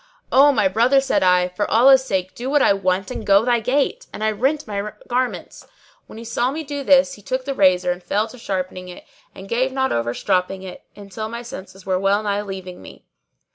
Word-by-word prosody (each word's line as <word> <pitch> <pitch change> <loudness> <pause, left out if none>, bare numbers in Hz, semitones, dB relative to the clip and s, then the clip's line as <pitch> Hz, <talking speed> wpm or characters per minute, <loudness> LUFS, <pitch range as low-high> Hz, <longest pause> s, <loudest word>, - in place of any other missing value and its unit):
"O 285 +2 +6
my 215 -7 +2
brother," 235 +8 +3
said 270 - 0
I, 180 -1 +3
"for 190 +3 -3
Allah's 260 +3 +6
sake 190 -6 -2
do 250 +2 -5
what 290 0 +3
I - - +5
want 190 -1 -1
and - - -5
go 200 +2 +4
thy 240 -1 +2
gait!" 265 +5 -1
And 210 - -6
I 220 - +2
rent 270 +8 -1
my 205 -1 -4
garments.[FN#616] 250 0 -3 0.4
When - - -12
he 230 - -9
saw 240 +2 0
me 310 +4 -4
do 285 -1 -5
this 275 0 +4
he 210 - -13
took 255 +5 -3
the 275 - -2
razor 185 -5 +3
and 180 +1 -5
fell 210 +4 -1
to 250 - -13
sharpening 185 -3 -4
it 180 - -12 0.3
and 190 - -10
gave 255 +5 0
not 265 0 -1
over 120 +1 -1
stropping 190 0 -1
it 185 -1 -9
until 205 +2 -7
my 235 +1 -6
senses 195 -6 -10
were 185 -1 0
well 200 +2 +1
nigh 205 -1 -1
leaving 190 -3 -8
me. - - -14
210 Hz, 220 wpm, -21 LUFS, 190-255 Hz, 0.4 s, O